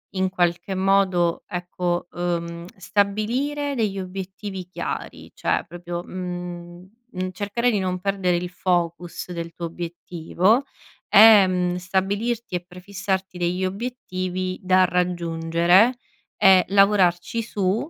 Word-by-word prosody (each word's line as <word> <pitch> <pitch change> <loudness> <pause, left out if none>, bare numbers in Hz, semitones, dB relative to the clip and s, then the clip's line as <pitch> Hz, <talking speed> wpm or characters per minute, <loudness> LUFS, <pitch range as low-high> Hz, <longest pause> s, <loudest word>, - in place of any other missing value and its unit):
in 190 0 +1
qualche 175 +1 0
modo, 185 -3 +2
ecco, 175 -1 -3
ehm, 170 -1 -3
stabilire 235 +10 -1
degli 215 -5 -1
obiettivi 190 +1 -6
chiari. 185 - -6
Cioè, - - 0
proprio, 175 0 -6
mhmm, 175 0 -7 0.2
mhmm, 185 0 -3
cercare 205 +6 -1
di 210 - +1
non 185 -1 -2
perdere 195 -2 0
il 175 0 -4
focus 175 -1 -2
del 170 -1 -5
tuo 170 - -5
obiettivo, 175 - 0 0.5
e, 210 -1 +8
mhmm, 180 -1 0
stabilirti 195 +5 -1
e 175 - -4
prefissarti 190 +1 -4
degli 175 +1 -1
obiettivi 185 -4 -4
da 185 0 +4
raggiungere, 175 +4 +2 0.4
e 190 -1 +6
lavorarci 195 0 +3
su 210 - -1
185 Hz, 115 wpm, -23 LUFS, 175-200 Hz, 0.5 s, e